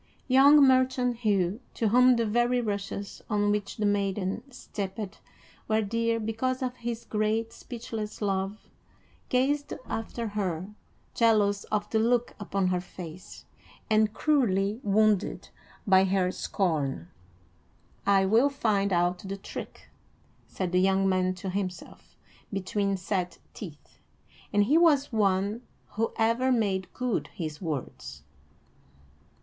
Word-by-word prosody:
Young 280 Hz, +3 st, +7 dB
merchant 255 Hz, -2 st, +2 dB
Hugh, 205 Hz, -3 st, +1 dB, 0.2 s
to 225 Hz, -, +1 dB
whom 250 Hz, +3 st, +6 dB
the 230 Hz, -1 st, +1 dB
very 240 Hz, +3 st, +2 dB
rushes 200 Hz, -2 st, -4 dB
on 205 Hz, -1 st, +2 dB
which 205 Hz, -1 st, -2 dB
the 215 Hz, -, 0 dB
maiden 200 Hz, 0 st, 0 dB
stepped 205 Hz, -4 st, -6 dB, 0.5 s
were 220 Hz, 0 st, +2 dB
dear 230 Hz, +2 st, 0 dB
because 240 Hz, +4 st, -2 dB
of 250 Hz, 0 st, -3 dB
his 235 Hz, -1 st, -5 dB
great 220 Hz, +1 st, -1 dB
speechless 225 Hz, -3 st, -6 dB
love, 195 Hz, 0 st, -1 dB, 0.7 s
gazed 285 Hz, +3 st, +1 dB
after 225 Hz, 0 st, -4 dB
her, 190 Hz, -2 st, -3 dB, 0.4 s
jealous 210 Hz, -3 st, +3 dB
of 210 Hz, -1 st, -1 dB
the 220 Hz, -, +2 dB
look 240 Hz, +2 st, +1 dB
upon 195 Hz, -2 st, -1 dB
her 180 Hz, -1 st, 0 dB
face, 180 Hz, -1 st, -10 dB, 0.5 s
and 215 Hz, 0 st, +4 dB
cruelly 220 Hz, -7 st, +1 dB
wounded 210 Hz, -1 st, +1 dB, 0.4 s
by 190 Hz, -1 st, +5 dB
her 185 Hz, -1 st, +1 dB
scorn. 145 Hz, -, -1 dB, 1.0 s
"I 195 Hz, -1 st, +4 dB
will 230 Hz, +8 st, +4 dB
find 210 Hz, -8 st, 0 dB
out 175 Hz, 0 st, +1 dB
the 195 Hz, +1 st, -6 dB
trick," 195 Hz, -, -9 dB, 0.6 s
said 185 Hz, -2 st, -3 dB
the 180 Hz, 0 st, +3 dB
young 195 Hz, 0 st, +3 dB
man 185 Hz, -1 st, +1 dB
to 185 Hz, +1 st, -5 dB
himself, 185 Hz, -2 st, -6 dB, 0.4 s
between 195 Hz, 0 st, -1 dB
set 180 Hz, -1 st, -2 dB, 0.2 s
teeth; 165 Hz, -8 st, -11 dB, 0.5 s
and 205 Hz, 0 st, +4 dB
he 290 Hz, +10 st, +4 dB
was 290 Hz, -6 st, +3 dB
one 200 Hz, +1 st, +1 dB, 0.3 s
who 225 Hz, +2 st, -1 dB
ever 230 Hz, +3 st, +2 dB
made 200 Hz, -6 st, 0 dB
good 240 Hz, -13 st, -2 dB
his 155 Hz, -3 st, -5 dB
words. 125 Hz, -, -5 dB
205 Hz, 125 wpm, -28 LUFS, 190-230 Hz, 1.0 s, Young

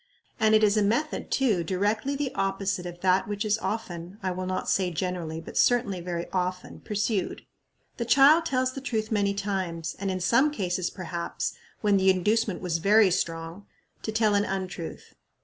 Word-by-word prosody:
And 220 Hz, 0 st, +4 dB
it 215 Hz, -, +4 dB
is 210 Hz, 0 st, +4 dB
a -, -, +4 dB
method, 235 Hz, +10 st, 0 dB
too, 220 Hz, -10 st, +2 dB
directly 210 Hz, -, 0 dB
the 275 Hz, -2 st, -2 dB
opposite 195 Hz, -3 st, -1 dB
of 175 Hz, 0 st, -9 dB
that 185 Hz, 0 st, +3 dB
which 205 Hz, +1 st, -3 dB
is 215 Hz, +1 st, +1 dB
often 185 Hz, -5 st, -4 dB
I 185 Hz, -, 0 dB
will 185 Hz, +1 st, -4 dB
not 185 Hz, -, -2 dB
say 185 Hz, -2 st, +2 dB
generally, 175 Hz, -2 st, -3 dB
but 165 Hz, -, -4 dB
certainly 230 Hz, -7 st, +2 dB
very 170 Hz, -1 st, -3 dB
often 180 Hz, 0 st, -3 dB
pursued. 205 Hz, -1 st, -2 dB, 0.5 s
The 235 Hz, -, -2 dB
child 295 Hz, +7 st, +6 dB
tells 255 Hz, -2 st, 0 dB
the 270 Hz, -, -6 dB
truth 220 Hz, -4 st, -2 dB
many 200 Hz, -2 st, +1 dB
times, 190 Hz, -5 st, -3 dB
and 195 Hz, 0 st, -2 dB
in 185 Hz, 0 st, -2 dB
some 235 Hz, +11 st, +3 dB
cases, 185 Hz, -9 st, -2 dB
perhaps, 170 Hz, -2 st, -4 dB, 0.3 s
when 205 Hz, -2 st, +3 dB
the 190 Hz, 0 st, +4 dB
inducement 205 Hz, +1 st, +1 dB
was 170 Hz, -3 st, -1 dB
very 205 Hz, +2 st, +5 dB
strong 165 Hz, +1 st, -3 dB, 0.3 s
to 220 Hz, -, -3 dB
tell 215 Hz, -1 st, +2 dB
an 205 Hz, 0 st, +3 dB
untruth. 190 Hz, -4 st, -5 dB
195 Hz, 180 wpm, -27 LUFS, 180-220 Hz, 0.5 s, child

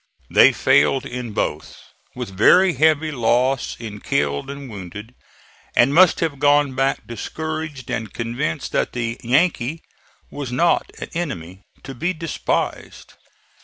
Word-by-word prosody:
They -, -, +7 dB
failed 75 Hz, -, +3 dB
in 125 Hz, -2 st, -5 dB
both, -, -, -3 dB, 0.4 s
with 95 Hz, -, -6 dB
very 180 Hz, -, +5 dB
heavy 155 Hz, +2 st, +2 dB
loss 125 Hz, 0 st, +1 dB
in 105 Hz, -3 st, -7 dB
killed 70 Hz, -, -1 dB
and 140 Hz, -1 st, -7 dB
wounded, 105 Hz, +2 st, -9 dB, 0.6 s
and 125 Hz, +4 st, +4 dB
must 180 Hz, +2 st, +5 dB
have 155 Hz, -5 st, -1 dB
gone 145 Hz, -1 st, +3 dB
back 135 Hz, +1 st, 0 dB
discouraged 155 Hz, +3 st, -5 dB
and 110 Hz, -4 st, -3 dB
convinced 130 Hz, +7 st, -3 dB
that -, -, -1 dB
the 115 Hz, -1 st, -3 dB
"Yankee" 145 Hz, +2 st, +1 dB, 0.5 s
was 140 Hz, -4 st, -6 dB
not 170 Hz, +8 st, +2 dB
an -, -, -6 dB
enemy 95 Hz, -, -5 dB, 0.2 s
to 135 Hz, -, -7 dB
be 175 Hz, +9 st, -2 dB
despised. 165 Hz, -3 st, -3 dB
130 Hz, 130 wpm, -21 LUFS, 115-155 Hz, 0.6 s, They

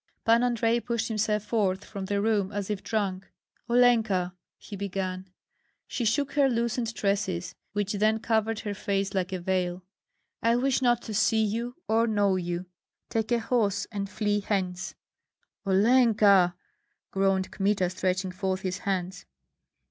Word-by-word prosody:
Pan 230 Hz, +1 st, +5 dB
Andrei 235 Hz, -1 st, +2 dB
pushed 235 Hz, -1 st, -2 dB
himself 215 Hz, -1 st, 0 dB
forth 205 Hz, -4 st, 0 dB
from 200 Hz, -2 st, -6 dB
the 200 Hz, +1 st, -1 dB
room 205 Hz, -2 st, +1 dB
as 205 Hz, -1 st, -3 dB
if 205 Hz, -, -3 dB
drunk. 195 Hz, -4 st, -2 dB, 0.4 s
"Olenka!" 225 Hz, -7 st, +3 dB, 0.2 s
he 205 Hz, -, -9 dB
began. 190 Hz, -1 st, -4 dB, 0.6 s
She 240 Hz, -, -3 dB
shook 280 Hz, +6 st, +1 dB
her 280 Hz, -2 st, +3 dB
loosened 235 Hz, -1 st, -1 dB
tresses, 195 Hz, -3 st, -1 dB, 0.2 s
which 205 Hz, -1 st, -1 dB
then 215 Hz, +2 st, +2 dB
covered 225 Hz, -1 st, 0 dB
her 205 Hz, -2 st, -3 dB
face 195 Hz, -1 st, -2 dB
like 185 Hz, -1 st, -1 dB
a 185 Hz, -, -1 dB
veil. 180 Hz, 0 st, -1 dB, 0.6 s
"I 230 Hz, +1 st, +3 dB
wish 265 Hz, +2 st, +1 dB
not 240 Hz, -2 st, +2 dB
to 220 Hz, -, -6 dB
see 220 Hz, +1 st, +3 dB
you 235 Hz, +4 st, -3 dB
or 225 Hz, +1 st, +3 dB
know 205 Hz, -3 st, +2 dB
you. 175 Hz, 0 st, -3 dB, 0.5 s
Take 225 Hz, +1 st, -1 dB
a 240 Hz, -, +4 dB
horse 215 Hz, -4 st, 0 dB
and 200 Hz, -2 st, -3 dB
flee 205 Hz, 0 st, 0 dB
hence!" 190 Hz, -3 st, -2 dB, 0.7 s
"Olenka!" 200 Hz, -3 st, +5 dB, 0.6 s
groaned 195 Hz, -1 st, +1 dB
Kmita, 195 Hz, -3 st, +1 dB
stretching 185 Hz, 0 st, -1 dB
forth 190 Hz, 0 st, -2 dB
his 185 Hz, -1 st, -3 dB
hands. 190 Hz, -1 st, -3 dB
205 Hz, 150 wpm, -27 LUFS, 190-225 Hz, 0.7 s, Pan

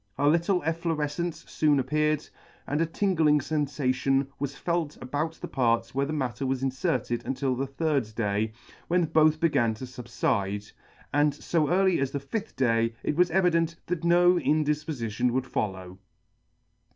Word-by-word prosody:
A 145 Hz, -, +2 dB
little 170 Hz, +4 st, +2 dB
efflorefcence 160 Hz, 0 st, -2 dB
foon 150 Hz, -2 st, +2 dB
appeared, 150 Hz, +3 st, 0 dB, 0.4 s
and 145 Hz, +3 st, -1 dB
a 165 Hz, -, +2 dB
tingling 165 Hz, -4 st, +2 dB
fenfation 135 Hz, -2 st, 0 dB
was 140 Hz, 0 st, -3 dB
felt 170 Hz, -4 st, -2 dB
about 145 Hz, +5 st, -2 dB
the -, -, -8 dB
parts 115 Hz, -2 st, 0 dB
where 140 Hz, +1 st, 0 dB
the -, -, -3 dB
matter 130 Hz, -6 st, -2 dB
was 135 Hz, 0 st, -1 dB
inferted 125 Hz, -2 st, -1 dB
until 130 Hz, +1 st, -1 dB
the 135 Hz, +2 st, -2 dB
third 140 Hz, -4 st, -1 dB
day, 105 Hz, -1 st, 0 dB, 0.4 s
when 175 Hz, 0 st, +2 dB
both 155 Hz, 0 st, +3 dB
began 120 Hz, -9 st, +2 dB
to 130 Hz, -, -7 dB
fubfide, 105 Hz, -5 st, -2 dB, 0.4 s
and 145 Hz, 0 st, +3 dB
fo 155 Hz, +1 st, 0 dB
early 185 Hz, 0 st, +3 dB
as 135 Hz, -1 st, 0 dB
the 140 Hz, -, -3 dB
fifth 205 Hz, +11 st, -5 dB
day 115 Hz, -2 st, +1 dB
it -, -, -1 dB
was 175 Hz, +2 st, +4 dB
evident 170 Hz, -2 st, +2 dB
that 175 Hz, -2 st, -3 dB
no 175 Hz, +1 st, +5 dB
indifpofition 150 Hz, -7 st, 0 dB
would 130 Hz, +2 st, -1 dB
follow. 95 Hz, -6 st, -4 dB
145 Hz, 150 wpm, -27 LUFS, 125-165 Hz, 0.4 s, no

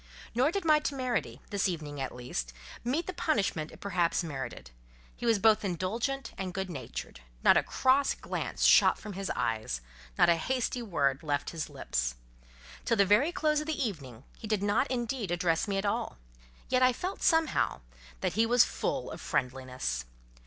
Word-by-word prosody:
Nor 250 Hz, +5 st, +3 dB
did 390 Hz, -1 st, -2 dB
my 305 Hz, -1 st, +6 dB
temerity, 255 Hz, -5 st, -2 dB
this 200 Hz, -1 st, +1 dB
evening 150 Hz, -5 st, -5 dB
at 135 Hz, -, -2 dB
least, 65 Hz, -, -4 dB, 0.3 s
meet 275 Hz, +8 st, 0 dB
the 370 Hz, -, -4 dB
punishment 195 Hz, -, 0 dB
it -, -, -14 dB
perhaps 180 Hz, -3 st, +1 dB
merited; 135 Hz, -, -6 dB, 0.4 s
he 240 Hz, -, -4 dB
was 225 Hz, -2 st, +5 dB
both 215 Hz, +1 st, +4 dB
indulgent 220 Hz, -, -2 dB
and 185 Hz, -2 st, -4 dB
good 190 Hz, -1 st, -3 dB
natured; 135 Hz, -, -7 dB, 0.2 s
not -, -, +7 dB
a -, -, +5 dB
cross 265 Hz, +2 st, +2 dB
glance -, -, -4 dB
shot -, -, +6 dB
from 210 Hz, -1 st, -8 dB
his 195 Hz, +1 st, -4 dB
eyes, 110 Hz, -, -1 dB, 0.4 s
not -, -, +6 dB
a 170 Hz, -1 st, +4 dB
hasty 250 Hz, +5 st, -1 dB
word 140 Hz, -, 0 dB
left 145 Hz, -2 st, -1 dB
his 165 Hz, -2 st, -4 dB
lips. -, -, -2 dB, 0.7 s
Till 230 Hz, -, +1 dB
the 200 Hz, -, +5 dB
very 215 Hz, -, +4 dB
close 305 Hz, -3 st, +1 dB
of 305 Hz, -, -7 dB
the 315 Hz, -, -2 dB
evening, 140 Hz, -, -4 dB, 0.2 s
he 220 Hz, -, -7 dB
did 210 Hz, -2 st, 0 dB
not 205 Hz, +7 st, +2 dB
indeed 240 Hz, -4 st, -2 dB
address 170 Hz, +1 st, +1 dB
me 200 Hz, -1 st, -1 dB
at 195 Hz, -, -1 dB
all, 200 Hz, -, -1 dB, 0.5 s
yet 255 Hz, 0 st, +2 dB
I 255 Hz, 0 st, +5 dB
felt, 370 Hz, +9 st, -4 dB
somehow, 320 Hz, -, +2 dB, 0.4 s
that -, -, 0 dB
he 225 Hz, +1 st, +3 dB
was 240 Hz, +1 st, +6 dB
full -, -, -2 dB
of -, -, -8 dB
friendliness. 125 Hz, -, -2 dB
200 Hz, 180 wpm, -30 LUFS, -, 0.7 s, not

